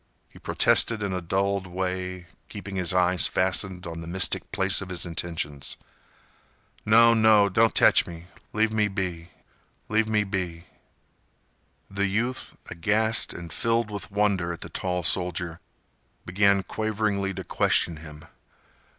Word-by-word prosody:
He - - -16
protested 110 -3 +2
in 100 -2 -2
a 90 - -3
dulled 95 +2 -1
way, 90 0 -4 0.2
keeping 95 +1 -8
his 90 -3 0
eyes 90 -1 +2
fastened 95 0 +1
on 85 0 -6
the 80 - -8
mystic 90 +1 0
place 95 -1 +1
of 95 - -7
his 90 -1 -1
intentions. 80 -4 -3 1.1
"No—no—don't 110 -1 +5
tech - - +5
me—leave 100 +6 -4
me 105 -1 +2
be—leave 95 +3 -5
me 105 -1 +2
be—" 90 -4 -4 1.2
The 100 0 -1
youth, 120 +6 -2 0.2
aghast 110 +6 +2
and 85 -3 -8
filled 115 +3 0
with 100 -3 -6
wonder 100 -4 0
at 85 - -7
the - - -7
tall 90 -1 -3
soldier, 90 0 -1 0.7
began 100 +1 +2
quaveringly 105 -2 -2
to 95 - -5
question 85 -1 +1
him. 75 -1 -12
95 Hz, 125 wpm, -25 LUFS, 90-105 Hz, 1.2 s, No—no—don't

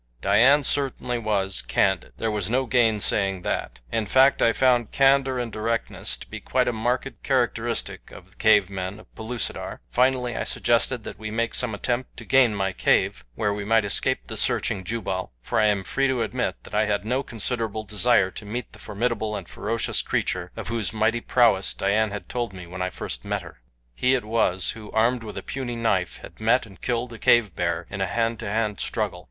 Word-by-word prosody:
Dian 125 - +5
certainly 130 -3 0
was 100 -3 +1
candid. 95 -2 0
There 115 - -1
was 105 -2 -2
no 130 +3 +1
gainsaying 105 -5 +1
that. - - -3
In 110 -2 -1
fact 135 +5 +4
I 115 - +5
found 120 -2 +2
candor 135 -1 +3
and 120 -2 -3
directness 115 +2 -2
to - - -11
be - - -7
quite - - 0
a 120 - +1
marked 120 +3 -2
characteristic - - -1
of - - -14
the - - -24
cave 110 -3 +5
men 95 +1 -5
of - - -23
Pellucidar. 115 +1 -4
Finally 125 -1 +2
I - - -1
suggested 120 0 +1
that - - -8
we 110 0 -5
make 115 +1 -1
some 120 -4 0
attempt 125 +4 -2
to - - -9
gain 130 -5 +4
my 95 -1 -1
cave, - - +1
where 105 -1 0
we 100 0 -4
might 110 +1 +3
escape 100 - +2
the - - -6
searching 95 - +1
Jubal, 95 - -3
for - - -1
I 110 - +4
am 100 -2 +1
free 135 +9 0
to 130 -3 0
admit 110 - -2
that - - -14
I 105 +1 +2
had 105 0 -1
no 125 +4 0
considerable 115 -3 -3
desire 105 -2 +3
to 110 - -8
meet 110 +3 -5
the 105 - -14
formidable 110 0 -2
and 95 -4 -6
ferocious 115 +2 -1
creature, 90 -1 -2
of - - -5
whose 115 -4 -1
mighty 115 +2 +1
prowess 115 -7 +3
Dian 105 +2 +1
had 105 0 -7
told 120 -4 -3
me 90 -2 -9
when 90 +2 -7
I 90 - 0
first - - -5
met - - -2
her. - - -13 0.3
He 125 - +2
it 125 - -2
was 100 -5 +2
who, 110 -2 -10
armed 115 +2 +2
with 110 -2 -8
a - - -5
puny 130 -3 -4
knife, 105 -6 0
had - - -12
met 115 +3 +3
and 100 -3 -16
killed 120 0 -2
a 115 - -10
cave 110 -8 +4
bear 85 -1 -1
in 100 -1 -4
a 95 - +1
hand 115 +1 -1
to 110 - -4
hand 105 -1 -1
struggle. - - -2
110 Hz, 205 wpm, -24 LUFS, 100-120 Hz, 0.3 s, Dian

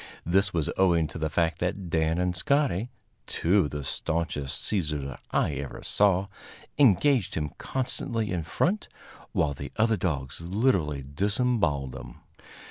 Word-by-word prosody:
This 95 +3 +3
was 80 -5 0
owing 85 -4 +4
to 80 - -7
the 80 0 0
fact 80 +2 +1
that 90 0 -2
Dan 80 0 +2
and 90 0 0
Scotty, 125 - +1 0.4
two 95 +2 +2
of - - -3
the 75 0 -5
staunchest 80 -2 -2
seizers 75 - -1
I - - +1
ever 70 -1 -6
saw, 100 -2 +3 0.5
engaged 130 -2 +4
him 75 -2 -2
constantly 115 -4 -2
in 90 -2 0
front, 175 - 0 0.4
while 75 -3 +1
the 70 0 -7
other 110 0 +3
dogs 70 -6 -2
literally 85 - +1
disemboweled 85 - 0
him. - - -9
85 Hz, 140 wpm, -27 LUFS, 75-105 Hz, 0.5 s, owing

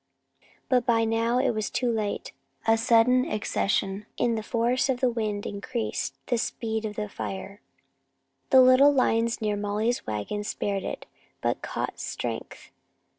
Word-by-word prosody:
But 250 -2 +3
by 230 -2 +2
now 230 +2 +1
it 260 0 +2
was 215 -2 -2
too 245 -2 0
late. 215 -3 -2 0.3
A 225 - +5
sudden 230 +2 +4
accession 210 -2 -1
in 235 - +2
the 220 - -1
force 235 +4 +1
of 255 -2 +1
the 255 -1 +2
wind 215 -3 -2
increased 135 - -3
the 240 - 0
speed 220 -1 -2
of 210 -1 -4
the 210 0 -3
fire. 195 +1 -6 0.9
The 260 -2 +8
little 255 +3 +7
line 235 -4 +2
near 210 -1 0
Molly's 210 +3 -1
wagon 110 - -3
spared 200 -1 -2
it, - - -5 0.3
but - - -1
caught - - -4
strength. - - -5
225 Hz, 150 wpm, -27 LUFS, 205-245 Hz, 0.9 s, The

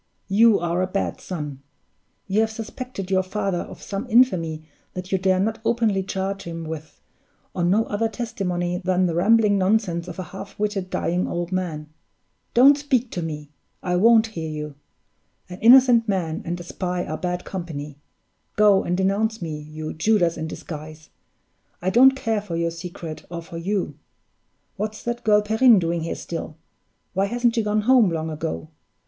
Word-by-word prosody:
You 220 +2 +5
are 175 +1 0
a 185 - +1
bad 195 +1 -2
son! 150 -7 -6 0.6
You 200 +2 0
have 220 - +1
suspected 220 -2 -6
your 190 -1 +4
father 195 -1 -2
of - - -8
some 205 +5 -5
infamy 175 -10 +3 0.3
that 185 0 -6
you 190 - +2
dare 185 0 +2
not 220 +3 0
openly 225 -4 +1
charge 195 +1 -3
him 165 -2 -6
with, 160 -1 -8 0.5
on 175 -1 0
no 215 +4 +3
other 225 +2 -1
testimony 180 -6 -3
than 185 0 +2
the 170 - 0
rambling 205 +3 +4
nonsense 185 -3 +1
of 175 - -7
a 185 - -3
half 195 +1 -8
witted, 205 -3 -2
dying 180 +1 -1
old 175 +1 -3
man. 170 -5 -3 0.7
Don't 275 +4 +7
speak 255 -4 0
to 175 - -3
me! 150 -3 -6 0.3
I 180 -1 0
won't 225 +4 +5
hear 165 -8 -5
you! 150 -1 -5 0.8
An 180 +1 -8
innocent 240 0 +7
man 170 -5 -1
and 175 +1 -3
a - - -7
spy 180 +1 -3
are 155 - -4
bad 180 +1 -3
company. 150 -6 -6 0.6
Go 205 -2 +5
and 175 +1 -1
denounce 205 +4 +1
me, 155 -3 -5
you 155 +1 -7
Judas 175 0 +2
in 160 -1 -4
disguise! 155 -1 -9 0.7
I 185 +2 -1
don't 265 +4 +7
care 225 -5 -1
for 190 -5 -5
your 170 0 0
secret 165 -2 -7
or 170 -1 -6
for 165 0 -9
you. 195 +3 -2 0.8
What's 215 +1 -4
that 240 0 -3
girl 210 -1 +4
Perrine 220 +2 +5
doing 170 -1 0
here 165 - -3
still? 165 -2 -6 0.6
Why 195 +1 +1
hasn't 240 +3 +1
she 230 - +1
gone 210 0 +1
home 240 -2 +5
long 160 -1 -3
ago? 80 - -4
185 Hz, 175 wpm, -23 LUFS, 170-215 Hz, 0.8 s, Don't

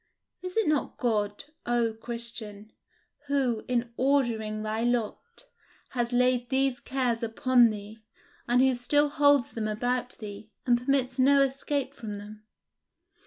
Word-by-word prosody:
Is 365 +2 -6
it 445 - +2
not 300 -2 0
God, 210 -4 -1 0.2
O 240 -2 +1
Christian, 225 -2 -7 0.6
who, 260 -6 0
in 240 -1 -1
ordering 235 -6 +1
thy 215 +1 -2
lot, 240 - -2 0.4
has 240 -1 -2
laid 250 0 +2
these 265 -1 +1
cares 250 -3 -1
upon 240 +1 +4
thee, 210 +1 -8 0.5
and 245 +2 +4
who 265 0 +4
still 290 +4 +2
holds 285 -3 +3
them 220 -2 -3
about 245 +3 -2
thee, 210 0 -9 0.2
and 245 -1 +2
permits 260 -1 0
no 275 +2 +5
escape 275 0 -2
from 215 -6 -7
them? 210 +1 -11
245 Hz, 135 wpm, -28 LUFS, 220-265 Hz, 0.6 s, no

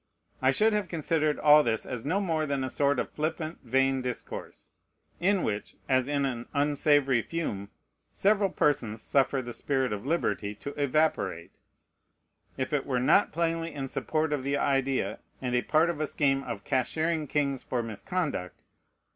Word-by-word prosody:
I 130 - +4
should 215 +10 +3
have 210 -3 0
considered 155 -2 0
all 150 0 +7
this 110 -3 -1
as 125 -3 -5
no 180 +8 0
more 160 -6 0
than 140 -1 -1
a 130 - -3
sort 145 0 +2
of - - -2
flippant, 155 +1 -3
vain 135 +2 +2
discourse, 125 -1 -6 0.5
in 190 +1 +2
which, 105 -1 -3
as 130 -1 +2
in 145 -1 +1
an 120 -3 -3
unsavory 145 -3 +3
fume, 105 -11 -4 0.4
several 200 0 +2
persons 115 -10 0
suffer 135 -1 +2
the 120 0 -6
spirit 130 -4 -1
of 100 - -5
liberty 125 -8 -1
to 140 +7 -7
evaporate, 145 - 0 1.1
if 130 +2 -3
it 140 -2 0
were 130 -3 +1
not 150 +10 +4
plainly 165 0 -1
in 135 -2 -3
support 155 +3 -1
of 145 - -1
the 140 +1 0
idea, 135 -1 0 0.2
and 125 -2 -3
a 125 - +3
part 155 +5 +3
of 160 - -8
the 155 - 0
scheme, 135 -2 +1
of 110 -5 -5
"cashiering 155 - 0
kings 140 -2 0
for 120 -2 -2
misconduct." 115 - -3
140 Hz, 165 wpm, -28 LUFS, 130-155 Hz, 1.1 s, all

